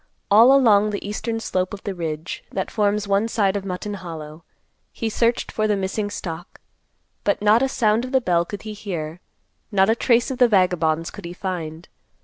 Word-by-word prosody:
All 225 +5 +8
along 215 -6 +5
the 205 -1 -4
eastern 225 +2 -3
slope 185 -3 -2
of 195 - -14
the 200 - -3
ridge, 160 -2 -5
that 190 - -3
forms 210 -1 0
one 200 +2 +2
side 200 -4 +1
of 200 - -2
Mutton 195 +2 -4
Hollow, 165 -4 -8 0.5
he 225 - -3
searched 235 +2 0
for 215 0 0
the 210 - +2
missing 200 +2 -2
stock, 175 -3 -7 0.6
but 200 - +1
not 210 +3 +4
a 270 - +2
sound 220 -2 +2
of 255 - -6
the 265 - +4
bell 175 -8 +1
could 200 +3 -8
he 215 -1 -6
hear; 175 -6 -5 0.5
not 195 +1 +4
a - - +2
trace 235 +1 +2
of 255 - -5
the 250 - +7
vagabonds 175 -6 +2
could - - -10
he 170 - -6
find. 175 -3 -5
200 Hz, 195 wpm, -22 LUFS, 175-220 Hz, 0.6 s, All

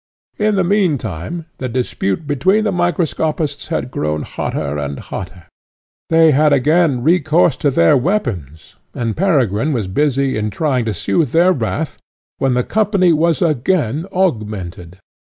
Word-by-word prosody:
In 215 0 +2
the 190 - +2
meantime 165 - -1
the 130 - -3
dispute 125 +1 -2
between 185 +10 +1
the 210 - 0
microscopists 160 -4 -1
had 160 -6 -3
grown 75 -5 -2
hotter 70 +1 -3
and 70 -1 -4
hotter; 90 +3 -8 0.7
they 160 -1 +5
had 150 +2 +3
again 145 -1 +2
recourse 160 -1 +3
to 145 - +1
their 85 -11 +4
weapons, 120 - -2 0.2
and 115 -3 -2
Peregrine 145 - +1
was 115 -6 -1
busy 135 +5 0
in 105 0 -1
trying 130 +2 -1
to 110 - -1
sooth 150 - 0
their 175 +3 +4
wrath, 145 +3 -3 0.4
when 135 -2 +1
the 125 - +1
company 200 - +2
was 165 +2 +1
again 155 - 0
augmented. 105 - -2
145 Hz, 140 wpm, -17 LUFS, 110-170 Hz, 0.7 s, they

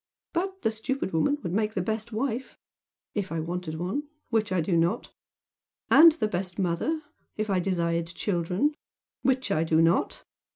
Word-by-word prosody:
But 380 +2 -2
the 220 - +3
stupid 220 -1 -3
woman 285 - +2
would 175 -2 -3
make 215 +1 0
the 185 - +1
best 220 +3 -3
wife 245 +2 -3 0.6
if 200 -4 -2
I 165 - -1
wanted 170 0 -3
one 195 - -2 0.2
which 220 -3 +1
I 185 - +2
do 170 +2 +1
not; 170 +7 +1 0.8
and 325 0 +9
the 305 -9 0
best 185 -2 -3
mother, 195 - 0 0.3
if 215 -1 -1
I 190 - +3
desired 170 -2 0
children, 180 - 0 0.5
which 260 0 +1
I 155 - +2
do 160 -1 +2
not. 165 +3 +2
195 Hz, 165 wpm, -27 LUFS, 170-240 Hz, 0.8 s, and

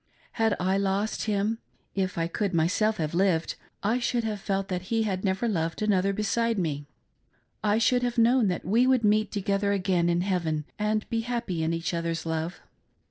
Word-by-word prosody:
Had 225 -2 +1
I 190 +2 +1
lost 200 +2 -1
him 215 +1 0 0.2
— - - -41
if 190 -2 -1
I 165 - +1
could 190 +2 -2
myself 205 +7 +2
have 155 -2 -2
lived 175 -2 +2 0.2
— - - -45
I 250 - +1
should 240 -1 0
have 210 -2 -3
felt 195 0 -1
that 185 -1 -4
he 225 -1 +2
had 190 -3 -2
never 195 +4 0
loved 165 -6 -1
another 195 -2 +2
beside 225 +3 0
me; 145 -5 -2 0.8
I 210 0 +3
should 245 +2 +3
have 245 0 -1
known 235 0 +4
that 180 - -2
we 230 +7 +3
would 260 -3 +3
meet 215 +1 +3
together 200 0 0
again 185 -3 +1
in 170 0 +2
heaven 170 -5 -1
and 215 0 0
be 230 - +1
happy 230 -8 -2
in 160 +1 0
each 165 +1 -2
other's 165 -1 -2
love. 160 +2 -3
195 Hz, 195 wpm, -27 LUFS, 175-220 Hz, 0.8 s, known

